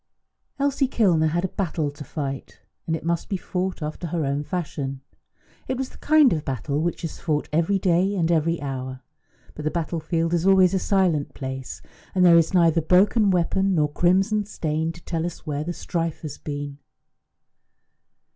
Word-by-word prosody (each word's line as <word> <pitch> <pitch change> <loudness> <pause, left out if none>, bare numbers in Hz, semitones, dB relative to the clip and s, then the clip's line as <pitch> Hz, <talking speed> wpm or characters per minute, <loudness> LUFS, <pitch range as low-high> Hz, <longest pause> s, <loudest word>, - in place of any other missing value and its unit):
Elsie 280 -1 +1
Kilner 180 -11 +3
had 175 +3 0
a - - -2
battle 160 -6 -2
to 145 +1 -9
fight, 140 -1 -5 0.3
and 160 - +1
it 160 - -7
must 170 0 -1
be 195 - 0
fought 180 -1 -3
after 155 +3 -4
her 165 -2 -1
own 140 +1 -1
fashion. 145 -6 -4 0.7
It 260 - -1
was 265 0 -3
the - - -17
kind 300 -4 +5
of 155 -2 -2
battle 140 +2 -2
which 175 +2 -2
is 165 - -5
fought 150 -3 -1
every 170 +5 +2
day 190 +1 +2
and 170 -3 +1
every 165 +1 +1
hour; 130 -1 -5 0.5
but 150 - -8
the 155 - +1
battlefield 165 0 -1
is 170 +2 +1
always 190 -1 +5
a 190 - +2
silent 180 -7 +1
place, 130 -1 -6 0.3
and 185 -1 +4
there 170 -1 +8
is 165 - +1
neither 165 -3 +4
broken 200 +6 +4
weapon 190 +2 +2
nor 150 -2 +2
crimson 195 +6 +2
stain 160 -3 -2
to 170 +1 -14
tell 165 -2 -2
us 175 0 -6
where 150 -1 -2
the 175 - -3
strife 165 -2 -3
has 150 -2 -6
been. 145 -1 -5
165 Hz, 180 wpm, -24 LUFS, 150-185 Hz, 0.7 s, there